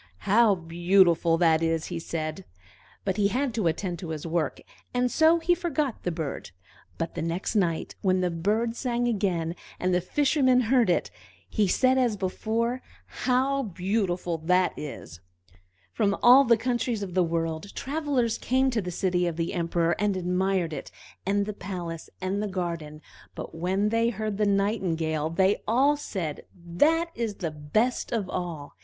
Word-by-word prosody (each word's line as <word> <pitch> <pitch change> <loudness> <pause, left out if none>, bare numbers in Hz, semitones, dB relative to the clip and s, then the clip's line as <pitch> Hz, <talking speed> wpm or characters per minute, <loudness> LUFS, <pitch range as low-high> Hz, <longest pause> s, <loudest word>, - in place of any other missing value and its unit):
"How 210 0 +5
beautiful 170 0 +3
that 165 -2 +3
is!" 165 -1 0
he 170 - -2
said; 160 +2 -4 0.6
but 190 0 -1
he 205 -1 +3
had 255 +4 -1
to 215 -6 0
attend 175 +1 -2
to 170 - -6
his 155 -1 -5
work, 165 -3 -1 0.4
and 250 0 +1
so 320 +1 +5
he 335 +1 +2
forgot 305 - -2
the - - -1
bird. 160 - -5 0.5
But 165 - -3
the - - -4
next 170 +6 -2
night, 170 -6 0
when 185 -1 +2
the 180 -1 0
bird 215 +8 0
sang 240 -1 -1
again, 180 -7 -1 0.2
and 185 0 +1
the 180 - +2
Fisherman 260 - +3
heard 240 -2 +3
it, 175 - +1 0.4
he 210 -3 +1
said 260 +7 +3
as 240 -5 +1
before, 225 +6 -1 0.2
"How 265 +2 0
beautiful 180 -4 -1
that 180 +3 +2
is!" 135 - -8 0.7
From 200 - +1
all 255 +3 +8
the 235 -2 +5
countries 240 -2 -1
of 185 -3 -6
the 185 0 +3
world 165 +2 -2
travelers 275 -5 -1
came 260 +1 +2
to 230 -3 0
the 180 - -5
city 180 0 0
of 170 - -2
the 165 0 -2
Emperor, 170 -1 +1
and 205 -2 +1
admired 180 -1 0
it, - - -6 0.4
and 200 +1 +2
the 210 - -4
palace, 175 -5 -6
and 190 +2 -2
the 210 - -1
garden; 170 -5 -4 0.3
but - - -7
when 190 +5 0
they 230 +1 +2
heard 215 -3 -3
the 210 - +3
Nightingale, 170 -7 0
they 190 +4 +2
all 265 +7 +4
said, 180 - -4
"That 290 - +1
is 230 -3 -3
the 165 -5 -3
best 155 +12 -1
of 220 -5 -1
all!" 170 -5 -5
190 Hz, 170 wpm, -27 LUFS, 170-235 Hz, 0.7 s, all